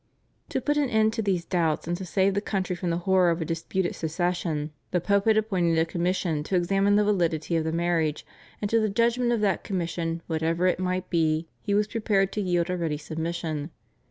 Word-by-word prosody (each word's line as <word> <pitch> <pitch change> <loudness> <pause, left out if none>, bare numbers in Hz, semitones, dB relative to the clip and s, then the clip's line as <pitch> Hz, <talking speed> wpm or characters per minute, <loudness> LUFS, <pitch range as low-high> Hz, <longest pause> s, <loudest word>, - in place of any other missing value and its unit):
To - - -1
put 295 0 0
an 285 -3 +2
end 220 -1 +3
to 225 - -1
these 190 -5 0
doubts, 165 -4 0
and 175 - 0
to 190 - -6
save 190 +2 +2
the 200 - 0
country 190 -3 -2
from 175 0 -3
the 170 - 0
horror 190 -2 +4
of 170 0 0
a 165 - -2
disputed 170 +3 -2
succession, 160 -2 -2 0.2
the 180 - +1
Pope 200 +3 +1
had 220 -1 +4
appointed 185 -6 +1
a 160 - +3
commission 170 -2 -1
to 190 - -1
examine 195 +3 +2
the 210 - +4
validity 170 -5 0
of 160 -1 +1
the 160 - 0
marriage; 165 -2 0 0.4
and 205 - 0
to 230 - +4
the 215 -1 +1
judgment 235 +3 +2
of 235 -3 +1
that 200 -4 +1
commission 170 -3 -3
whatever 165 +2 0
it 185 - +2
might 185 0 -2
be 160 -1 +1
he 200 -2 0
was 210 +1 +3
prepared 205 -3 +1
to 210 - -2
yield 175 -2 0
a 180 - -1
ready 160 -3 -1
submission. 160 0 -4
180 Hz, 215 wpm, -26 LUFS, 165-200 Hz, 0.4 s, horror